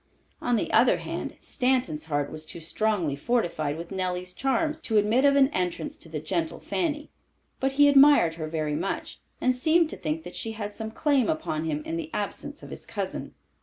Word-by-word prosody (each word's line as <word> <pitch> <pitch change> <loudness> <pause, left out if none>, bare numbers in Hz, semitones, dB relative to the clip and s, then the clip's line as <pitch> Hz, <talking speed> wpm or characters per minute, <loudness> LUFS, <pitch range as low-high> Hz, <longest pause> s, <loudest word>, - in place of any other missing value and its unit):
On 245 - +1
the 220 - -1
other 235 +3 +5
hand, - - -5
Stanton's 250 -13 0
heart 145 -2 -1
was 155 0 -6
too 160 - -8
strongly 170 -2 0
fortified 155 -6 -1
with 170 +2 -8
Nellie's 180 -1 -2
charms 305 - 0
to 225 -9 0
admit 220 +6 +3
of 280 0 +5
an 275 -1 +5
entrance 180 - -2
to 165 - -11
the 155 -1 -4
gentle 160 +1 -2
Fanny. 300 -3 -2 0.5
But 270 0 0
he 290 +1 +6
admired 280 - +7
her 160 -1 -5
very 155 -2 -2
much, - - -4 0.2
and 255 - +3
seemed 315 +5 +3
to - - -6
think 160 -1 -3
that 175 - -9
she 225 - -3
had 210 -1 -5
some 220 0 -5
claim 275 +2 +2
upon 240 - -1
him 150 -1 -2
in 165 - -3
the 160 -1 -5
absence 285 +8 -4
of - - -10
his - - -9
cousin. - - -4
205 Hz, 200 wpm, -27 LUFS, 160-270 Hz, 0.5 s, admired